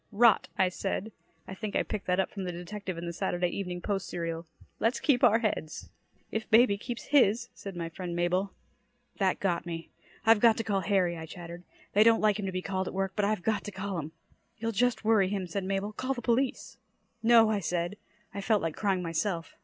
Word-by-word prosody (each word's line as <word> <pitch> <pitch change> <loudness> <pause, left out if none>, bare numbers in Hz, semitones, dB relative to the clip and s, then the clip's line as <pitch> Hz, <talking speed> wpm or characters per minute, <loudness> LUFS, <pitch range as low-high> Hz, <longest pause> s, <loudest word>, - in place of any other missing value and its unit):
"Rot," 220 +1 +5
I 185 - +3
said; 195 +3 -3 0.4
I - - -6
think 205 +1 -5
I - - +3
picked 210 -2 -5
that 180 +1 +2
up 190 - 0
from 195 - -5
the 180 - -2
detective 185 +1 -6
in 170 - -5
the 170 - -4
Saturday 175 +1 0
Evening 180 -3 -4
Post 195 0 -2
serial. 165 -1 -4 0.3
"Let's 230 +2 +1
keep 265 -4 +2
our 225 -3 +7
heads." 210 -9 -3 0.4
"If 220 0 -3
baby 225 -1 +6
keeps 235 +3 -7
his," 235 -3 +4
said 195 -2 -8
my 170 -1 -3
friend 170 +1 -6
Mabel. 180 +3 0 0.7
That 190 -2 +2
got 175 -3 -1
me. 165 -1 -6 0.3
"I've 225 -1 +6
got 225 0 +5
to 225 - -1
call 205 -3 0
Harry," 190 -3 +1
I 160 -1 -7
chattered. 170 +1 -9 0.3
"They 210 - +6
don't 225 0 +5
like 210 -1 +2
him 200 - -2
to - - -2
be 185 0 -3
called 190 -1 -2
at - - -5
work, 195 0 -1
but 210 - +1
I've 210 -3 0
got 215 -3 0
to 205 - -5
call 190 -1 -4
him." 155 0 -6 0.5
"You'll 225 +1 -2
just 230 +1 +1
worry 215 -4 +4
him," 195 -2 -2
said 185 +2 -3
Mabel. 195 +2 -2
"Call 260 +4 -2
the 240 - -5
police." 250 +3 0 0.4
"No!" 225 -1 +6
I 210 - +1
said. 175 +1 -2 0.4
I 200 - -4
felt 210 -1 +2
like 165 -2 -2
crying 195 -3 0
myself. 165 +1 -2
195 Hz, 220 wpm, -29 LUFS, 180-220 Hz, 0.7 s, our